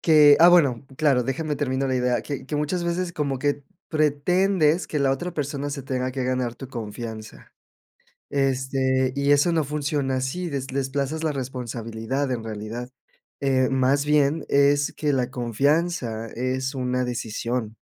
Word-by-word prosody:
que 150 -3 +7
ah, 170 +2 +8
bueno, 140 -8 +4
claro, 140 -6 +3
déjame 150 +3 -2
termino 135 -1 -1
la 130 - +1
idea, 125 -2 +1
que 140 +1 -6
que 150 - -4
muchas 160 +4 -1
veces 170 0 -1
como 140 -4 -1
que 145 -1 -1 0.2
pretendes 160 +3 +2
que 150 - -2
la 135 -1 +3
otra 175 +6 -3
persona 145 -1 -3
se 140 -1 -5
tenga 130 -1 -2
que 130 - -3
ganar 125 -2 -1
tu 135 - -9
confianza, 110 -2 -7 0.8
este, 130 -1 0
y 140 0 +1
eso 145 +4 +4
no 160 -2 +2
funciona 145 -2 -1
así, 150 +7 -2
des 135 -2 -3
desplazas 140 +4 -2
la 155 - +1
responsabilidad 125 0 -3
en 120 -3 -3
realidad. 110 +3 -6 0.5
Eh, 135 -1 +2
más 135 +2 +2
bien 150 +1 +2
es 140 +1 +3
que 150 -2 0
la 125 -1 0
confianza 125 0 0
es 130 +4 -2
una 125 -1 -1
decisión, 115 -1 -3
135 Hz, 155 wpm, -24 LUFS, 125-150 Hz, 0.8 s, ah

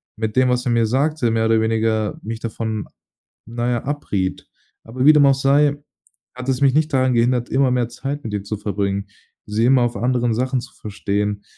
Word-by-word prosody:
mit 110 -1 -3
dem, 130 0 +4
was 125 0 0
er 125 - +1
mir 115 -1 +3
sagte, 130 +1 0
mehr 110 0 +1
oder 110 0 +3
weniger 110 -1 0
mich 115 +1 -5
davon, 110 -2 -4 0.6
na 120 +1 -3
ja, 120 -2 -1
abriet. 100 -10 -3 0.4
Aber 125 +3 -3
wie 155 - +8
dem 150 -2 +5
auch 135 -1 +5
sei, 140 +2 +3 0.6
hat 125 +1 -5
es 130 0 0
mich 135 -2 +4
nicht 155 +1 +1
daran 130 -1 +2
gehindert, 120 +1 +1
immer 135 -1 +2
mehr 125 -2 0
Zeit 140 +4 -5
mit 110 - -6
ihr 100 -1 -3
zu 105 +1 -4
verbringen, 100 0 -2 0.4
sie 105 +2 0
immer 130 0 +4
auf 120 -1 -1
anderen 120 -1 0
Sachen 130 +2 -1
zu - - -12
verstehen. 105 0 -3
120 Hz, 200 wpm, -20 LUFS, 110-130 Hz, 0.6 s, wie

